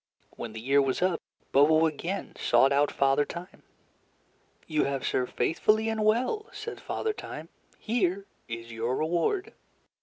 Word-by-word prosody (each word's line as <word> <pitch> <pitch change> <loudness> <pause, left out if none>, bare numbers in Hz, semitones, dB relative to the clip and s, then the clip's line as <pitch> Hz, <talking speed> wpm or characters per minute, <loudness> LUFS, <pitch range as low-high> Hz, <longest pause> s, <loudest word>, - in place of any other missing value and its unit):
When 115 - -6
the 110 - -6
year 135 +5 +3
was 135 +5 0
up, 185 -2 +1 0.3
Bobo 155 +3 +5
again 170 +5 -3
sought 120 +3 +4
out 145 +1 +3
Father 135 +1 +3
Time. 175 +4 -9 1.0
"You 155 -2 +1
have 140 -1 -2
served 125 - -1
faithfully 215 +6 +2
and 220 -1 -1
well," 255 - +1
said 435 +2 -7
Father 440 - -2
Time. - - -8 0.3
"Here 200 -4 0 0.2
is 115 0 -6
your 115 +3 -1
reward." 175 - 0
160 Hz, 145 wpm, -28 LUFS, 135-215 Hz, 1.0 s, Bobo